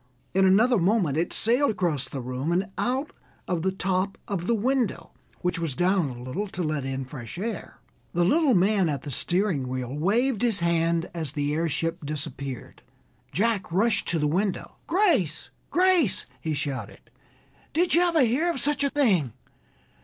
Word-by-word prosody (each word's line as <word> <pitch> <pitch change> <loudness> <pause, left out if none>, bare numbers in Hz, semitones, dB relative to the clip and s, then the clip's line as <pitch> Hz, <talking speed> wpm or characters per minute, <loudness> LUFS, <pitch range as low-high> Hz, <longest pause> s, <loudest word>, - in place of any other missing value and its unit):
In 190 +1 +4
another 225 +5 +4
moment 180 -5 +2
it 165 +3 0
sailed 245 +5 +3
across 175 - 0
the 135 - -5
room 130 +5 -3
and 185 +2 0
out 265 +4 -1 0.4
of 175 -3 -1
the 190 +3 +1
top 190 +1 -1
of 185 -3 -3
the 235 - +3
window, 245 +1 0 0.3
which 180 -1 -1
was 160 -6 -2
down 180 -2 +2
a 120 -1 -8
little 170 +12 -3
to 185 -2 -4
let 155 -3 -2
in 135 0 -3
fresh 130 0 -8
air. 210 0 -5 0.4
The 175 0 +2
little 290 - +4
man 190 -1 +3
at 140 -3 -3
the 145 - -6
steering 175 -2 0
wheel 130 0 -4
waved 220 - +1
his 230 -7 +1
hand 170 0 +1
as 160 -5 -4
the 145 0 -1
airship 165 +1 -1
disappeared. 140 -3 -6 0.5
Jack 210 -2 0
rushed 210 +5 +1
to 170 - 0
the 150 - +1
window. 185 +6 -1
"Grace, 330 - +1 0.2
Grace!" 360 - +3
he 155 +4 -2
shouted, 130 -6 -5 0.6
"did 345 +4 +1
you 340 - +5
ever 340 -3 +3
hear 260 +9 +2
of 335 - -2
such 285 +1 0
a 280 - +2
thing? 200 - +2
180 Hz, 170 wpm, -26 LUFS, 150-230 Hz, 0.6 s, you